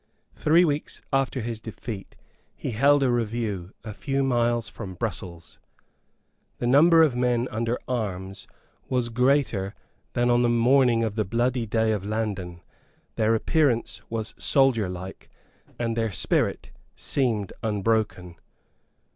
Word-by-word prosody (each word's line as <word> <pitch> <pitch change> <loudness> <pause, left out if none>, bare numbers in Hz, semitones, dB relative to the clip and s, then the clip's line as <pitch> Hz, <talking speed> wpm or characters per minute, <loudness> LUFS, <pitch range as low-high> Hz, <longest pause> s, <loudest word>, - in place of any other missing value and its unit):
Three 165 +4 +4
weeks 150 -2 -2
after 135 -1 +1
his 115 -1 -4
defeat 110 -2 -7 0.4
he - - -4
held 140 +5 +4
a 130 - +3
review 110 -6 -2
a 110 - -6
few 135 +4 -1
miles 120 -3 +1
from 95 -6 -8
Brussels. 85 -5 -6 1.0
The - - -3
number 160 +6 +6
of 145 -6 +2
men 125 0 +1
under 115 +2 -1
arms 100 -6 -4 0.4
was 125 -2 0
greater 125 -5 +1 0.4
than 120 0 +2
on 120 0 +4
the 120 - +3
morning 120 0 +4
of 110 -2 -1
the 110 0 0
bloody 120 +3 0
day 110 +1 +1
of 105 -3 -1
Landen; 100 -5 -3 0.5
their 110 +1 +2
appearance 120 - +1
was 110 -1 -4
soldierlike; 105 - 0 0.5
and 115 -1 -1
their 115 -2 0
spirit - - 0 0.2
seemed 115 -8 -1
unbroken. 105 -4 -1
115 Hz, 130 wpm, -25 LUFS, 105-125 Hz, 1.0 s, number